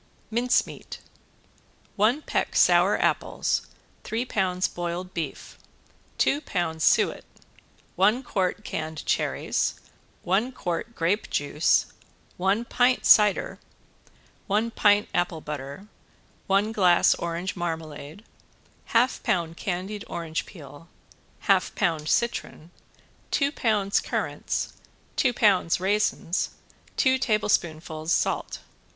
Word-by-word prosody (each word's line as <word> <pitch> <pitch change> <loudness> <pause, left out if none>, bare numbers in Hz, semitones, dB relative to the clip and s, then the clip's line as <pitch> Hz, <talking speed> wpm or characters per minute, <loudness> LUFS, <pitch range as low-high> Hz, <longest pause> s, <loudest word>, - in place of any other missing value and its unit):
~MINCE 240 +2 +2
MEAT~ - - -9 1.0
One 230 +9 +2
peck - - -2
sour - - +5
apples, - - 0 0.4
three 230 +3 -2
pounds 185 -5 0
boiled 175 +1 -5
beef, 160 -5 -6 0.6
two 290 - +2
pounds 160 - -2
suet, - - +3 0.7
one 210 +8 +3
quart 195 -2 -2
canned 155 0 -5
cherries, - - 0 0.4
one 210 +8 +1
quart 180 +4 -4
grape 175 +6 0
juice, 145 +2 +2 0.5
one 195 +5 +1
pint 250 +1 +2
cider, 210 -2 +5 0.9
one 215 +3 +1
pint 205 -1 +3
apple 175 -2 0
butter, 145 +5 -7 0.6
one 200 +3 +2
glass 180 -5 +4
orange 170 +2 -4
marmalade, 160 0 -5 0.6
half 240 +3 +2
pound 170 -8 -1
candied 190 +4 -4
orange 165 -1 -4
peel, 150 -1 -13 0.5
half - - +2
pound 160 -3 0
citron, 235 -8 -1 0.6
two 280 0 +1
pounds 210 -7 +1
currants, - - -3 0.4
two 260 - +3
pounds 195 -8 +3
raisins, 195 -2 0 0.4
two 260 0 +3
tablespoonfuls 170 -8 0
salt. - - 0
185 Hz, 100 wpm, -26 LUFS, 165-215 Hz, 1.0 s, sour